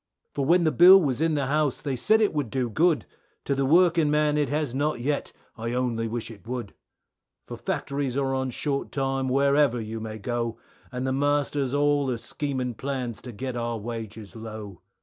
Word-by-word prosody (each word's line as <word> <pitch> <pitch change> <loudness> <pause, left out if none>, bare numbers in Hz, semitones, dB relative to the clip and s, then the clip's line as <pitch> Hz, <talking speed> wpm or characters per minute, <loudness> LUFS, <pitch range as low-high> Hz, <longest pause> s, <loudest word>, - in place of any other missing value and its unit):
For 140 - -1
when 175 +2 +5
the 155 - +3
bill 185 +4 +9
was 140 -5 -1
in 160 -1 +2
the 140 -2 0
house 145 -1 +1
they 140 -3 -3
said 220 - +3
it 210 - +2
would 145 -6 -1
do 125 0 -1
good, 160 +5 +2 0.4
To 140 - +1
the 135 -1 0
working 170 0 +4
man 150 0 +2
it 150 -1 +1
has 150 -4 -1
not 145 0 0
yet, 140 +4 -1 0.2
I 115 +1 -4
only 120 -2 -1
wish 115 0 -4
it 105 -2 -14
would, 120 -4 -5 0.7
For - - -7
factories 140 -2 -3
are 135 -1 0
on 130 0 -1
short 140 +2 -3
time 135 -1 -1
wherever 140 -1 +3
you 110 0 -5
may 110 0 -6
go, 115 +1 -3 0.3
And 125 +1 -3
the 130 - 0
masters 145 -1 0
all 145 -1 +2
are 125 - -1
scheming 130 0 -3
plans 125 -2 -4
to 125 - -8
get 130 +3 -5
our 120 -1 -2
wages 110 -2 -7
low. 110 -4 -8
135 Hz, 195 wpm, -26 LUFS, 120-145 Hz, 0.7 s, bill